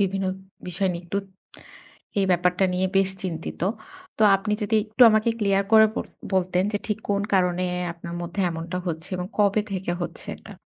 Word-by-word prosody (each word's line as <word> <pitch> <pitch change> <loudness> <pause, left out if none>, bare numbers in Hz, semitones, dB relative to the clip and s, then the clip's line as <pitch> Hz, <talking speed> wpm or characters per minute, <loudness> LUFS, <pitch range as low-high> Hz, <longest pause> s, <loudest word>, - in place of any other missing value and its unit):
বিভিন্ন 195 0 0 0.4
বিষয় 185 +2 0
নিয়ে 170 0 -6
একটু 200 +3 -1 1.0
এই 195 - +3
ব্যাপারটা 180 +2 +2
নিয়ে 185 +1 +1
বেশ 195 0 +4
চিন্তিত। 165 -4 -5 0.6
তো - - +1
আপনি 210 +2 -3
যদি 210 +2 0
একটু 220 +3 +2
আমাকে 215 +1 +3
ক্লিয়ার 200 -1 +2
করে 220 0 +9
বল - - -2 0.3
বলতেন 185 0 +2
যে, - - +1
ঠিক 210 -1 -1
কোন 200 0 +1
কারণে 180 -1 +2 0.3
আপনার 170 0 -8
মধ্যে 175 +3 -4
এমনটা 165 +2 -5
হচ্ছে 160 0 -4
এবং 180 0 -3
কবে 205 0 +4
থেকে 185 -2 -2
হচ্ছে - - -6
এটা? - - -12
190 Hz, 175 wpm, -24 LUFS, 175-200 Hz, 1.0 s, করে